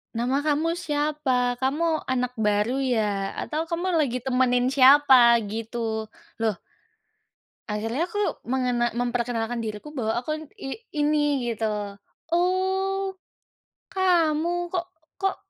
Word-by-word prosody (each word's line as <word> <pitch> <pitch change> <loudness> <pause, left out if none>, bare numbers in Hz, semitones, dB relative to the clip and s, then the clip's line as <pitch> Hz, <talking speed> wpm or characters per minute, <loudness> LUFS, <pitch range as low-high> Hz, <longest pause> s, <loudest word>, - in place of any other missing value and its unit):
"Nama 255 +5 0
kamu 310 +2 +1
siapa? 295 -6 0
Kamu 305 +6 0
anak 250 -1 -2
baru 210 +2 +1
ya? 210 -6 0
Atau 310 +1 -2
kamu 345 +2 -2
lagi 255 -5 0
temenin 250 -1 +2
siapa?" 260 -3 +7
Gitu. 220 0 -4 0.3
Loh 220 -2 +1 1.1
akhirnya 225 +10 -1
aku 410 - -6 0.3
mengena 250 -2 +1
memperkenalkan 240 -1 -1
diriku, 215 +5 -6
bahwa 225 -6 -1
aku 250 +5 -3
n - - -8
i 270 - -6 0.3
ini 295 -4 +1
gitu, 225 0 -2 0.7
"Oh, 380 +2 0 0.8
kamu. 345 -1 +1
Kok 350 -2 -1 0.4
kok, 390 0 +1
260 Hz, 110 wpm, -25 LUFS, 235-315 Hz, 1.1 s, siapa